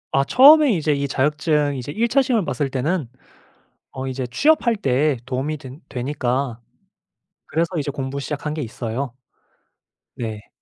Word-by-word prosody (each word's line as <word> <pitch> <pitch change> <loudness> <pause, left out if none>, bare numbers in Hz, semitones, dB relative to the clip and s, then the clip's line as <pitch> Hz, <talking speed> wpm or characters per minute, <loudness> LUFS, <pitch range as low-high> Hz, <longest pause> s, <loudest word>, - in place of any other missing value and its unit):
아 135 - +4
처음에 290 - +7
이제 155 -3 +1
이 140 0 -1
자격증 150 +1 +1
이제 130 +2 -5
1 230 +9 +1
차 275 +3 +3
시험을 240 -8 +1
봤을 140 0 -2
때는 135 +1 -1 0.8
어 135 0 -5
이제 130 0 -3
취업할 245 - +2
때에 140 - +1
도움이 135 +4 -2
된 135 +2 -11
되니까 130 -2 -2 0.9
그래서 165 +2 0
이제 145 -1 -2
공부 135 0 -4
시작한 150 +2 -4
게 155 - -4
있어요. 120 +1 -4 1.0
네. 110 -3 -6
140 Hz, 285 characters per minute, -21 LUFS, 130-155 Hz, 1.0 s, 처음에